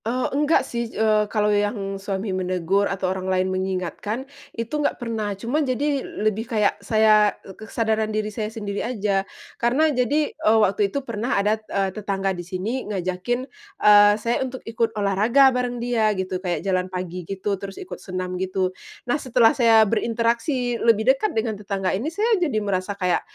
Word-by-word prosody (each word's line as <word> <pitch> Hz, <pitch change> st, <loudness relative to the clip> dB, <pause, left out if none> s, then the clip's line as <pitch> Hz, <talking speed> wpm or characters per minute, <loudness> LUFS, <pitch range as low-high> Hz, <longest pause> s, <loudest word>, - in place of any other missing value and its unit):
Eee, 250 Hz, +3 st, -1 dB
enggak 295 Hz, +3 st, +2 dB
sih, 235 Hz, -1 st, -3 dB
eee, 215 Hz, -1 st, +2 dB
kalau 210 Hz, -1 st, +1 dB
yang 205 Hz, -1 st, -1 dB
suami 195 Hz, 0 st, -3 dB
menegur 185 Hz, +1 st, 0 dB
atau 195 Hz, -1 st, -2 dB
orang 190 Hz, 0 st, -4 dB
lain 185 Hz, 0 st, +1 dB
mengingatkan 190 Hz, +6 st, -3 dB, 0.3 s
itu 230 Hz, +6 st, -2 dB
enggak -, -, 0 dB
pernah, 220 Hz, -4 st, -3 dB
cuma 245 Hz, +10 st, -1 dB
jadi 280 Hz, +1 st, 0 dB
l-lebih 215 Hz, +1 st, -2 dB
kayak 215 Hz, -4 st, +2 dB
saya, 215 Hz, 0 st, +4 dB
e 190 Hz, -, -10 dB
k 215 Hz, +3 st, -12 dB
kesadaran 220 Hz, -1 st, 0 dB
diri 215 Hz, 0 st, -2 dB
saya 215 Hz, 0 st, -3 dB
sendiri 205 Hz, -2 st, -4 dB
aja, 205 Hz, -5 st, 0 dB, 0.4 s
karena 285 Hz, +6 st, +3 dB
jadi, 285 Hz, +4 st, +1 dB
eee, 220 Hz, +1 st, +2 dB
waktu 205 Hz, -1 st, +2 dB
itu 280 Hz, +5 st, -4 dB
pernah 235 Hz, +2 st, -2 dB
ada, 210 Hz, +2 st, +1 dB
eee, 195 Hz, -1 st, -1 dB
tetangga 195 Hz, -2 st, -2 dB
di 175 Hz, -, -6 dB
sini 195 Hz, +8 st, -4 dB
ngajakin, 190 Hz, +6 st, -2 dB, 0.3 s
eee, 205 Hz, 0 st, +7 dB
saya 230 Hz, +4 st, -1 dB
untuk 260 Hz, -1 st, -5 dB
ikut 225 Hz, 0 st, 0 dB
olahraga 220 Hz, +7 st, +4 dB
bareng 250 Hz, -1 st, -1 dB
dia 230 Hz, -4 st, +1 dB
gitu, 185 Hz, -1 st, -3 dB
kayak 180 Hz, 0 st, -3 dB
jalan 185 Hz, -1 st, 0 dB
pagi, 180 Hz, -1 st, -5 dB
gitu, 195 Hz, +3 st, -3 dB
terus 195 Hz, -1 st, -7 dB
ikut 370 Hz, -, -8 dB
senam, 185 Hz, -1 st, -4 dB
gitu. 185 Hz, 0 st, -1 dB, 0.3 s
Nah, 285 Hz, +4 st, 0 dB
setelah 235 Hz, -2 st, +4 dB
saya 225 Hz, -3 st, +5 dB
berinteraksi 235 Hz, +3 st, 0 dB
lebih 230 Hz, +2 st, +4 dB
dekat 345 Hz, +11 st, -1 dB
dengan 220 Hz, 0 st, 0 dB
tetangga 195 Hz, -2 st, -2 dB
ini, 225 Hz, +11 st, -1 dB
saya 420 Hz, +3 st, +1 dB
jadi 290 Hz, -10 st, +1 dB
merasa 200 Hz, -1 st, -2 dB
kayak 180 Hz, -3 st, +1 dB
215 Hz, 175 wpm, -23 LUFS, 195-240 Hz, 0.4 s, eee